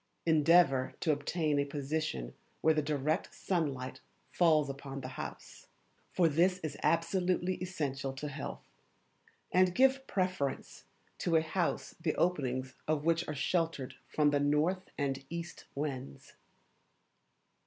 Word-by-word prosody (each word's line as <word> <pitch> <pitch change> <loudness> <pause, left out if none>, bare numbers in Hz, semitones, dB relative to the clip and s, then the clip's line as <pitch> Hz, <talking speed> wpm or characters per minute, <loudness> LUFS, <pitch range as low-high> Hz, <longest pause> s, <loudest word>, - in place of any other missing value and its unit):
Endeavour 160 -4 +4
to 160 - +2
obtain 150 0 0
a - - +3
position 140 - -3 0.3
where 160 - +5
the 155 - +1
direct 150 +1 -1
sunlight 135 -7 -2 0.3
falls 155 -4 +4
upon 135 0 -6
the 130 - -6
house, 130 - -8 0.4
for 175 - +4
this 175 +4 +3
is 155 -2 -3
absolutely 175 +3 +1
essential 145 -7 -2
to 135 +3 -5
health; 145 -1 -6 0.9
and 185 0 +4
give 265 +1 +4
preference 185 -8 -2 0.3
to 170 - +1
a 160 - +5
house 170 +2 -1
the 160 -2 0
openings 130 -7 0
of 155 -1 0
which 165 +1 +2
are 150 - -3
sheltered 160 -2 -1
from 150 -1 +2
the 145 - +2
north 150 +6 +1
and 135 -1 -1
east 170 0 -6
winds. 130 - -5
155 Hz, 130 wpm, -32 LUFS, 140-170 Hz, 0.9 s, where